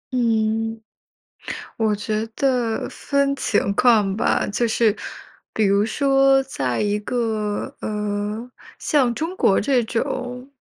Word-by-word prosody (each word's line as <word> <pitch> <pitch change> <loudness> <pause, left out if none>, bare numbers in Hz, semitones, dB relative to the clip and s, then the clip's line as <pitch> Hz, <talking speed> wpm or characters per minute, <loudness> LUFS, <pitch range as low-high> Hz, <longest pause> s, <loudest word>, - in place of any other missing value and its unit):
嗯， 225 -1 0 1.0
我 220 -3 +1
觉 215 +1 -2
得 245 -5 0
分 280 -1 0
情 205 -5 +1
况 210 -4 +3
吧。 - - +1
就 235 +4 0
是 220 -1 +2 0.6
比 220 - +1
如 200 +1 +3
说 270 +2 +3
在 130 - -2
一 210 0 0
个， 220 +1 -2
呃， 210 +2 -3 0.3
像 255 -6 +1
中 325 +6 -3
国 195 - +3
这 255 +2 +2
种 250 +3 -3
225 Hz, 125 characters per minute, -22 LUFS, 210-255 Hz, 1.0 s, 况